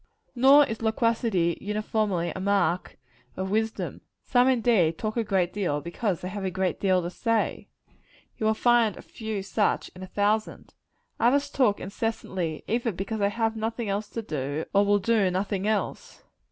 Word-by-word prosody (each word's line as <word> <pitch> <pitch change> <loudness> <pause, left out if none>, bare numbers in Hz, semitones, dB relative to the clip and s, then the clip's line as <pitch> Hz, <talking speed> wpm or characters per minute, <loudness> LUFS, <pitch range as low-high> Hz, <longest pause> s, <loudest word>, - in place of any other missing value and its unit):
Nor 275 +4 +7
is 225 -3 -5
loquacity 220 -6 +1
uniformly 210 -4 -1
a - - -4
mark 185 -3 0 0.4
of 190 +1 -3
wisdom. 220 +1 -2 0.2
Some, 245 0 +3
indeed, 225 -10 +3
talk 215 -1 -3
a 235 - +1
great 190 -4 0
deal, 175 -8 -1
because 175 +4 -2
they 185 - -4
have 200 +1 -5
a 190 - 0
great 185 -2 -1
deal 185 -2 +2
to 175 - -4
say: 230 +2 -1 0.7
you 215 - +1
will 220 - +3
find 235 -3 +3
a - - -10
few 220 -3 -5
such 205 +1 0
in 185 - -11
a 185 - -6
thousand. 210 +3 -1 0.5
Others 280 +4 +2
talk 235 -7 +2
incessantly, 190 -5 -3
either 235 +1 0
because 195 +4 -4
they 200 0 +2
have 225 +1 -1
nothing 225 0 -3
else 205 +2 -2
to 230 - -5
do, 145 -3 -3
or 200 0 +5
will 205 0 +3
do 205 -1 +2
nothing 195 +2 -1
else. 215 -1 -3
205 Hz, 170 wpm, -26 LUFS, 185-225 Hz, 0.7 s, Nor